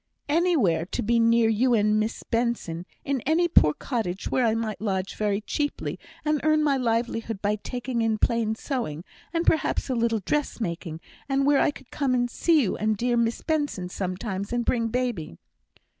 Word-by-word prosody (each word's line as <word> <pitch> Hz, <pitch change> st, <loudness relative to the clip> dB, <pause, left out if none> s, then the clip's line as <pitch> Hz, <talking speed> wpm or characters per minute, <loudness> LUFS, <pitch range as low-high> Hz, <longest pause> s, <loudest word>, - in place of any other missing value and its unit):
"Anywhere 290 Hz, -, +2 dB
to -, -, -3 dB
be 235 Hz, +2 st, +2 dB
near 230 Hz, 0 st, +4 dB
you 235 Hz, +3 st, +3 dB
and 210 Hz, 0 st, +3 dB
Miss 215 Hz, +1 st, -2 dB
Benson; 230 Hz, -8 st, -2 dB, 0.2 s
in 275 Hz, -3 st, 0 dB
any 335 Hz, +3 st, +3 dB
poor 150 Hz, -, +5 dB
cottage 200 Hz, -8 st, -3 dB
where 250 Hz, -2 st, +3 dB
I 220 Hz, -, +2 dB
might 220 Hz, -2 st, -3 dB
lodge 195 Hz, -3 st, -1 dB
very 205 Hz, -1 st, 0 dB
cheaply, 290 Hz, +7 st, -3 dB, 0.3 s
and 300 Hz, -1 st, +1 dB
earn 310 Hz, 0 st, +3 dB
my 285 Hz, -2 st, +3 dB
livelihood 230 Hz, -3 st, -1 dB
by 205 Hz, +1 st, 0 dB
taking 245 Hz, +2 st, -3 dB
in 225 Hz, -1 st, +1 dB
plain 225 Hz, -1 st, +1 dB
sewing, 220 Hz, -, -3 dB, 0.3 s
and 335 Hz, 0 st, -1 dB
perhaps 310 Hz, -3 st, +1 dB
a -, -, +2 dB
little 230 Hz, -2 st, +1 dB
dressmaking; 175 Hz, -, -2 dB, 0.3 s
and 275 Hz, 0 st, +2 dB
where 285 Hz, -1 st, +4 dB
I -, -, +4 dB
could 270 Hz, -3 st, -10 dB
come 270 Hz, -3 st, 0 dB
and 245 Hz, -1 st, 0 dB
see 320 Hz, -4 st, +3 dB
you 195 Hz, -, -1 dB
and 215 Hz, 0 st, 0 dB
dear 240 Hz, +3 st, +1 dB
Miss 235 Hz, 0 st, 0 dB
Benson 290 Hz, -, -1 dB
sometimes 190 Hz, +2 st, -4 dB
and 240 Hz, -1 st, 0 dB
bring 230 Hz, -2 st, +1 dB
baby." 230 Hz, -, -2 dB
230 Hz, 180 wpm, -26 LUFS, 210-265 Hz, 0.3 s, poor